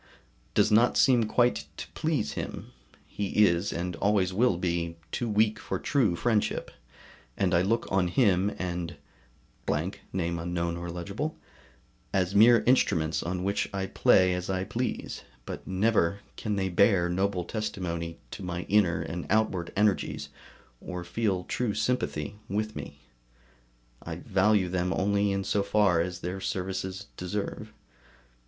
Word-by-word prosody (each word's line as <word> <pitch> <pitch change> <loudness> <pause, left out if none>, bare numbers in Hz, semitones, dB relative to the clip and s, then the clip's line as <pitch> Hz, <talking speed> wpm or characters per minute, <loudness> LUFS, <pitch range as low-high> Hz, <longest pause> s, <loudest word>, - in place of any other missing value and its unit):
] - - -35
does 110 - +4
not 115 +3 +4
seem 125 -4 +5
quite 105 -11 +2
to - - -6
please 155 - -1
him; - - -6 0.3
he 105 +1 +2
is, 85 +1 +1
and 90 +1 -3
always 100 -3 +2
will 110 -2 +3
be, 85 -2 -2
too 120 - -2
weak 110 +1 +2
for - - -3
true 120 - +1
friendship, 110 +4 0 0.7
and 95 -2 +1
I 85 - +5
look 115 +5 +1
on 95 -2 +2
him 95 -1 +3
and 90 -2 -3 0.7
as 80 +7 -1 2.4
mere 115 +3 +7
instruments 85 -11 +2
on 90 +1 -3
which 100 +1 0
I 95 -1 -2
play 95 -1 +4
as 90 0 -3
I 95 -1 0
please, 120 +5 -3 0.2
but - - -7
never 100 -1 +1
can 105 -2 -2
they 95 -1 0
bear 95 -1 +4
noble 95 +1 0
testimony 85 -5 -4
to - - -7
my 90 -1 -3
inner 100 -5 +2
and 85 0 -5
outward 100 -5 +1
energies, 105 -1 +1 0.5
or 90 -1 -6
feel 95 0 -1
true 115 +2 -2
sympathy 105 -5 -1
with 110 +2 -2
me; 70 0 -8 1.0
I 85 - -6
value 95 +1 +2
them 90 0 0
only 100 +1 +1
in 100 0 -1
so 100 - +1
far 100 -4 +3
as 90 0 -4
their 90 +2 -4
services 95 -1 -3
deserve. 95 +3 -4
95 Hz, 135 wpm, -28 LUFS, 90-105 Hz, 2.4 s, mere